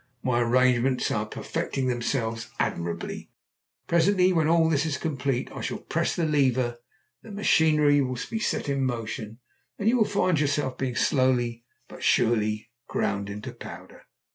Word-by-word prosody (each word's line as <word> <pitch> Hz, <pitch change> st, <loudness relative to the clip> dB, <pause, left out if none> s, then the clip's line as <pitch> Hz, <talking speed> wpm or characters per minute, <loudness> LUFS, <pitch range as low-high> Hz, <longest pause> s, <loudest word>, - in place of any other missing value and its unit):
My 120 Hz, -2 st, +1 dB
arrangements 125 Hz, +1 st, +2 dB
are 105 Hz, 0 st, -1 dB
perfecting 130 Hz, +4 st, -3 dB
themselves 115 Hz, -2 st, -2 dB
admirably. 85 Hz, 0 st, -3 dB, 0.6 s
Presently, 180 Hz, +2 st, +3 dB
when 160 Hz, -3 st, +2 dB
all 165 Hz, 0 st, +3 dB
is 145 Hz, 0 st, 0 dB
complete, 135 Hz, -5 st, -2 dB
I -, -, -7 dB
shall -, -, -3 dB
press -, -, -1 dB
the 170 Hz, -, 0 dB
lever, 130 Hz, -5 st, +1 dB, 0.4 s
the -, -, -13 dB
machinery 155 Hz, -8 st, +3 dB
will 125 Hz, -2 st, -2 dB
be 225 Hz, -, -1 dB
set 215 Hz, -, -1 dB
in 140 Hz, -1 st, 0 dB
motion, 115 Hz, -3 st, -4 dB, 0.4 s
and 205 Hz, -, -2 dB
you 245 Hz, +3 st, +4 dB
will 220 Hz, -, +4 dB
find 185 Hz, -6 st, +1 dB
yourself 145 Hz, -2 st, 0 dB
being 130 Hz, -2 st, -2 dB
slowly 120 Hz, -4 st, +1 dB, 0.2 s
but -, -, -12 dB
surely 110 Hz, -1 st, +1 dB, 0.2 s
ground 100 Hz, 0 st, -1 dB
into 105 Hz, +1 st, -6 dB
powder. -, -, -11 dB
130 Hz, 145 wpm, -26 LUFS, 120-155 Hz, 0.6 s, you